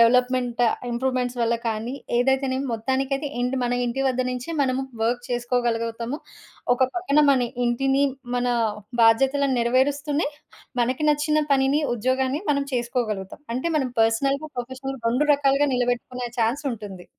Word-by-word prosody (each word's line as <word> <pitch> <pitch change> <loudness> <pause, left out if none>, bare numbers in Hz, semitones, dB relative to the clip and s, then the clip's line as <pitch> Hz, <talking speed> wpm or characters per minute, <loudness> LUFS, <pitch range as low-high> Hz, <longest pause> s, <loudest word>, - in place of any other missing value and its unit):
Development, 250 0 +3 0.3
improvements 250 0 -1
వల్ల 230 0 +2
కానీ, 225 +3 -3 0.2
ఏదైతేనేమి 265 +1 +1
మొత్తానికైతే 265 +5 -1
ఇంటి, 250 +2 0
మన 245 0 0
ఇంటి 255 +3 -1
వద్ద 255 0 0
నుంచే 250 +5 -5
మనము 265 0 0 0.2
వర్క్ 240 +2 0
చేసుకోగలుగుతాము. 240 +1 -1 0.6
ఒక 250 - -12 0.2
పక్కన 300 -5 +3
మన 265 - +4 0.3
ఇంటిని, 270 +3 +2 0.3
మన 245 - 0 0.6
బాధ్యతలను 270 +4 +4
నెరవేరుస్తూనే 285 +5 +1 0.5
మనకి 255 +5 0
నచ్చిన 300 +1 +2
పనిని, 275 +3 +3
ఉద్యోగాన్ని 260 - 0
మనం 280 -1 +1
చేసుకోగలుగుతాం. 235 -5 -2
అంటే 260 +7 -2
మనం 265 -3 -1
పర్సనల్‌గా, 275 +7 +2
ప్రొఫెషనల్‌గా 260 +2 -5 0.2
2 260 +5 +2
రకాలుగా 280 0 +2
నిలబెట్టుకునే 245 0 -1
ఛాన్స్ 235 +7 +1
ఉంటుంది. 200 -5 -8
255 Hz, 125 wpm, -24 LUFS, 240-275 Hz, 0.6 s, మన